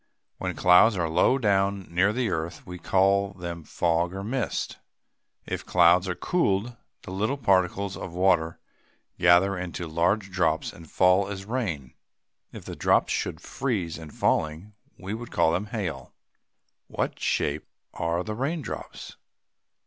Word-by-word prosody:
When - - -3
clouds 90 +4 +5
are 85 -2 0
low 80 +10 +3
down, 100 -4 +1
near 95 +4 +3
the 120 -2 -1
earth, 80 0 -4
we 90 0 -8
call 100 +2 +2
them 85 -3 -6
fogs 85 +3 0
or 95 - -5
mist. 120 -1 -3 0.7
If - - -4
clouds 90 +1 +4
are 90 - -1
cooled, 120 - 0 0.3
the - - -8
little 110 +9 -1
particles 100 -3 +1
of 90 - -7
water 85 -3 +2 0.6
gather 90 +3 +5
into 90 -1 -5
large 90 +5 0
drops 80 -4 0
and 80 -2 -13
fall 95 +1 +3
as 100 -1 -6
rain. 100 - -3 0.6
If - - -10
the - - -7
drops - - +2
should - - -3
freeze 95 -12 -3
in 80 -2 -9
falling, 80 +7 -1 0.2
we 95 +2 -6
would 120 +2 -6
call 80 - +2
them 95 +5 -1
hail. 90 - -5 0.7
What - - -3
shape 75 +1 -1 0.3
are 85 +1 -1
the 110 - -4
raindrops? 140 +7 -5
95 Hz, 145 wpm, -26 LUFS, 85-100 Hz, 0.7 s, clouds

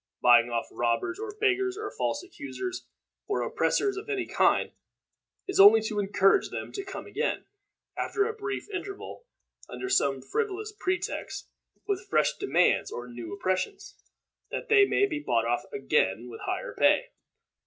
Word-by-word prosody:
Buying 120 -1 +6
off 115 -1 -1
robbers, 120 - -1
or 425 -1 -6
beggars, 385 -2 +1
or 425 -1 -5
false - - -2
accusers, 365 +2 -6 0.4
or 410 - 0
oppressors 400 -2 0
of 415 +2 -7
any 400 -3 -1
kind, - - +2 0.8
is 385 - -1
only 205 +3 +10
to 215 -1 -2
encourage 195 -1 +3
them - - -6
to 395 - -5
come 390 - -7
again, - - -2 0.5
after 405 - 0
a 450 - -2
brief 410 -2 -5
interval, 395 +5 -7 0.4
under 380 - -5
some 135 - +2
frivolous 430 -1 -2
pretext, 370 -3 -3 0.4
with 395 0 -2
fresh - - +2
demands 400 - +2
or 120 0 -6
new 120 -1 -8
oppressions, 200 - -2 0.5
that - - -5
they 405 -2 +7
may 405 - +3
be 310 -7 -3
bought 115 - 0
off 120 +1 0
again 125 -5 0
with 115 - -9
higher - - -3
pay. - - +3
370 Hz, 155 wpm, -28 LUFS, -, 0.8 s, only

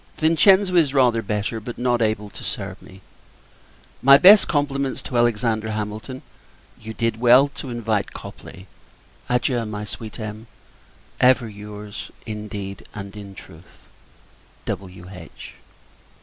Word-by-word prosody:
Vincenzo 185 +4 +4
is 150 -5 +3
rather 120 -4 +4
better, 105 +2 -2
but 115 +2 -8
not 120 0 +1
able 110 -2 -1
to - - -10
serve - - -5
me. 95 +1 -15 1.0
My 140 +1 +8
best 200 +7 +8
compliments 140 -3 -1
to 125 - -6
Alexander 115 -2 +1
Hamilton. 110 +4 -5 0.6
You 110 0 -8
did 115 -1 -1
well, 125 +4 +6
to 140 -1 -8
invite 115 -3 -2
Copley. 95 +2 -11 0.6
Adieu! 125 -1 +1
my 105 0 -5
sweet 110 +2 -8
Em. 110 +1 -7 0.7
Ever 125 -1 +4
your's, 105 0 -9 0.2
in 105 -1 -6
deed 100 -2 -7
and 100 -1 -8
in 100 -2 -10
truth, 80 -1 -16 0.8
W.H. 90 -2 -8
110 Hz, 125 wpm, -22 LUFS, 105-125 Hz, 1.0 s, My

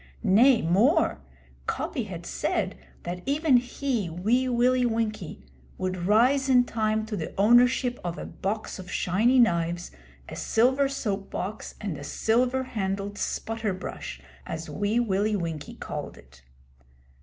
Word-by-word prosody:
Nay, 235 +5 +5
more 230 - +3 0.5
Coppy - - -2
had - - -8
said - - -1 0.3
that 180 +1 -5
even 285 -1 +4
he, 245 -4 -2
Wee 225 +10 +1
Willie 250 +1 +3
Winkie, 215 - -2 0.3
would 185 -1 -2
rise 255 +6 +4
in 250 -1 +6
time 220 -2 -1
to 220 -1 -4
the 160 -5 -5
ownership 245 +3 +4
of 175 0 -3
a - - -6
box 210 +1 -4
of 185 -1 -9
shiny 220 +8 +2
knives, 175 -6 +2 0.4
a - - -7
silver 260 +4 +2
soap 205 -8 -3
box, 200 +4 -5
and 200 -6 -4
a - - -8
silver 245 - +1
handled 200 -3 -3
'sputter 225 -3 -2
brush,' 65 - -7 0.3
as 160 0 -5
Wee 205 +3 0
Willie 210 -2 +1
Winkie 165 -5 -4
called - - -6
it. 65 +2 -18
215 Hz, 140 wpm, -26 LUFS, 185-245 Hz, 0.5 s, in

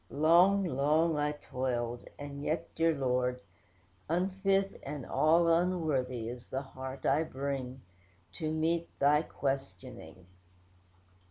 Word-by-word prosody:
Long, 175 +6 +5
long 155 +1 +2
I 150 0 0
toiled; 120 -4 -3
and 140 0 -7
yet, 155 +3 -2
dear 165 0 +2
Lord, 125 -2 0 0.7
unfit, 195 +3 +1
And 145 -4 -6
all 165 +2 +3
unworthy, 155 -9 +1
is 120 +1 -7
the 135 +1 -3
heart 130 0 -8
I 140 +3 +3
bring, 135 -3 -4 0.6
To 155 -1 -1
meet 165 +2 0
Thy 145 +2 +4
questioning. 135 - -5
145 Hz, 110 wpm, -31 LUFS, 130-165 Hz, 0.7 s, Long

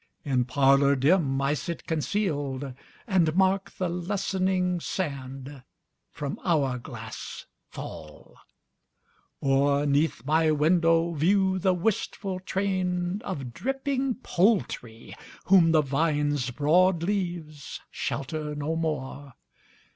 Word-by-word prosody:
In 130 -3 +1
parlour 140 +1 +4
dim 140 0 +2
I 140 +1 +2
sit 170 +3 -5
concealed, 145 -6 -2 0.3
And 175 -7 +2
mark 190 +1 +2
the 185 - 0
lessening 185 0 0
sand 135 -5 -5 0.5
from 145 -2 -5
hour 140 -8 +1
glass - - -8 0.2
fall; 75 -1 -10 1.1
Or 140 +1 +2
'neath 145 -3 +1
my 155 +2 +3
window 165 +2 +3
view 190 +4 +2
the 185 0 +2
wistful 190 0 -2
train 185 0 -1
Of 135 - -5
dripping 270 - -1
poultry, 175 - 0 0.3
whom 180 -4 +6
the 155 -2 +4
vine's 145 -2 0
broad 165 +6 +3
leaves 175 -6 -3
Shelter 150 +2 -3
no 150 +2 -2
more. 145 -4 -3
160 Hz, 100 wpm, -27 LUFS, 140-185 Hz, 1.1 s, whom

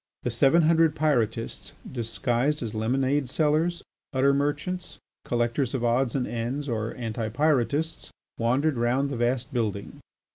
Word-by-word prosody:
The 125 - -1
seven 140 +8 +4
hundred 160 -1 +4
Pyrotists 115 -7 0 0.2
disguised 125 +4 -1
as 115 -2 -4
lemonade 130 +5 0
sellers, 155 +4 +1 0.3
gutter 135 0 +3
merchants, 145 +6 -2 0.3
collectors 120 +2 0
of 125 - -2
odds 120 +1 +1
and 130 -2 0
ends, 120 +5 -3
or 115 -2 -2
anti 115 -2 -3
Pyrotists, 150 +4 0 0.3
wandered 130 +5 +1
round 125 +4 +1
the - - -2
vast 120 +1 0
building. 105 -5 -2
130 Hz, 135 wpm, -26 LUFS, 120-145 Hz, 0.3 s, seven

